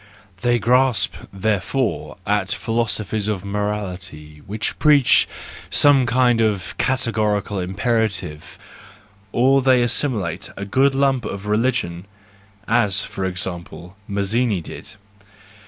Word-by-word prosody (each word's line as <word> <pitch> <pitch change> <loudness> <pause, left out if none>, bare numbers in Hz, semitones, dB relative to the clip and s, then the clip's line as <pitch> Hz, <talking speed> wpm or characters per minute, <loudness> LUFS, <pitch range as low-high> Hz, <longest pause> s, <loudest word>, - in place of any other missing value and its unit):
They 120 0 +2
grasp, 125 0 +2 0.2
therefore, 110 +5 -1
at 105 -1 0
philosophies 110 -2 -1
of 100 -3 -2
morality 95 -7 -4
which 105 +3 -3
preach 145 -3 +5 0.4
some 140 -3 +5
kind 120 -1 +3
of 105 -4 -1
categorical 110 -6 0
imperative, 95 -4 -2 0.7
or 135 +4 +3
they 130 -2 +4
assimilate 110 - -1
a 100 - -4
good 135 +7 +2
lump 135 -2 +2
ot 100 0 -6
religion, 105 -5 -1 0.6
as, 105 -5 +2
for 95 - -4
example, 90 0 -4
Mazzini 100 +2 0
did. 80 - -9
105 Hz, 105 wpm, -21 LUFS, 95-125 Hz, 0.7 s, preach